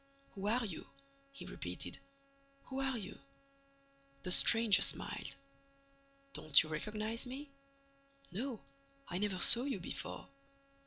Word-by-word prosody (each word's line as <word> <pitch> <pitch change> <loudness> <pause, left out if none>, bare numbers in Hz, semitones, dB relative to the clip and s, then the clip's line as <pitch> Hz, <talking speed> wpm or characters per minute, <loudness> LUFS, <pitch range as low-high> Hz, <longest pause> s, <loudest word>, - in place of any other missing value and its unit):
"Who 200 0 -5
are 235 +3 +1
you?" 185 -7 -7 0.4
he 275 - -11
repeated. - - -7 0.6
"Who 265 +1 -5
are 265 -2 -1
you?" 210 - -8 1.0
The 180 - -3
stranger 225 +2 +6
smiled: - - 0 1.0
"Don't 150 -1 +5
you 155 - -10
recognize 215 +9 -3
me?" 275 +3 -8 0.8
"No, 235 +4 -5 0.5
I 175 - -3
never 205 -2 -1
saw 235 +6 +8
you 275 -1 -3
before." - - -7
220 Hz, 115 wpm, -34 LUFS, 190-255 Hz, 1.0 s, saw